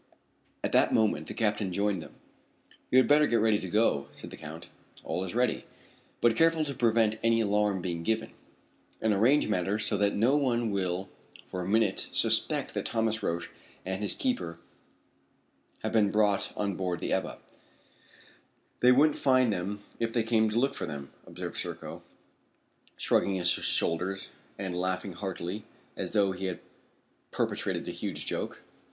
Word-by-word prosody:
At - - -1
that - - +4
moment 105 -9 +1
the - - -7
captain 105 -3 0
joined 100 -1 0
them. - - -12 0.7
"You 130 - +4
had 130 - +6
better 150 +1 +5
get - - +1
ready 105 -1 +3
to 95 - -6
go," 105 -8 +2
said - - -10
the - - -7
Count. 80 +1 -9 0.4
"All 85 +3 -2
is 95 +3 -5
ready." 125 -1 +1 0.6
"Be 120 - +5
careful 165 +5 +3
to 140 - -3
prevent 115 -3 +2
any 115 0 +3
alarm 105 -3 +1
being 85 -2 -3
given, 110 +5 -1 0.7
and 110 -1 +3
arrange 120 +9 +4
matters 105 +1 0
so 105 - +1
that 100 0 +2
no 120 +7 +3
one 120 -5 +1
will 95 -1 -1 0.4
for 90 - -5
a 90 - -4
minute 105 -1 +2
suspect - - +3
that - - -2
Thomas 110 -1 0
Roch 85 +1 -2 0.3
and 95 +2 -3
his 105 - +1
keeper 250 - -2 1.3
have - - -1
been 105 -3 +3
brought 105 -1 +2
on 100 -2 -1
board 90 -2 -2
the - - -2
Ebba." - - -2 1.4
"They 125 - +6
wouldn't 145 +4 +4
find 130 -4 +4
them 100 +3 -4 0.2
if 115 -1 0
they 115 -1 +1
came 110 -1 +2
to 105 - -2
look 135 +3 +2
for - - -4
them," 70 -1 -7 0.2
observed - - -6
Serko, - - -5 1.0
shrugging 100 - +2
his 90 -2 +2
shoulders 90 +5 0 0.3
and 95 -3 -4
laughing 90 +1 -2
heartily 95 +2 -5 0.3
as - - -4
though 100 -3 +3
he 95 +1 -5
had 90 -1 -3 0.7
perpetrated - - -2
a - - -2
huge - - -4
joke. - - -4
105 Hz, 165 wpm, -29 LUFS, 95-115 Hz, 1.4 s, had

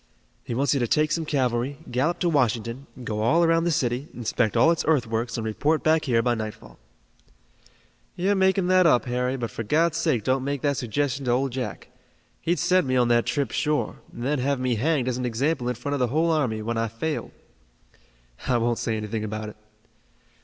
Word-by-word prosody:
"He 120 - -4
wants 140 +4 +2
you 140 - +1
to 120 - 0
take 150 +5 +2
some 160 +1 0
cavalry, 130 -1 0
gallop 145 +8 +1
to 175 - +2
Washington, 125 -2 0 0.2
go 105 -2 -3
all 160 +10 +3
around 165 0 +3
the 170 - +2
city, 125 -1 -1
inspect 120 -1 0
all 145 +8 +6
its 165 - 0
earthworks 115 -6 0
and 115 - -3
report 145 +8 0
back 155 0 +3
here 115 -4 +2
by 120 0 +2
nightfall." 110 - -7 1.4
"You're 190 +3 +1
making 190 -1 +2
that 185 -1 +5
up, 125 -5 +3
Harry; 125 +1 -1
but 120 -3 -4
for - - -5
God's 160 +9 +1
sake 155 -10 +1
don't 130 +2 +1
make 140 -1 -3
that 140 -2 +1
suggestion 140 +2 -2
to 120 - +1
Old 130 +2 +1
Jack. 120 -8 -5 0.5
He'd 175 +2 0
send 185 -1 +2
me 130 - +1
on 120 -1 +3
that 120 -1 +3
trip 140 -5 -1
sure, 150 0 -1
and 120 - -8
then 145 +2 0
have 140 +1 0
me 125 -1 0
hanged 130 +3 0
as 125 -1 -1
an 125 - -2
example 125 +2 -1
in 125 - -1
front 130 +5 -4
of 145 - -1
the 125 - +2
whole 160 +7 +1
army, 125 -9 0
when 115 +1 -2
I 115 - 0
failed." 115 +8 -3 1.2
"I 125 - +3
won't 120 0 0
say 110 -1 -1
anything 110 0 -3
about 110 0 -4
it." - - -12
130 Hz, 210 wpm, -25 LUFS, 115-155 Hz, 1.4 s, all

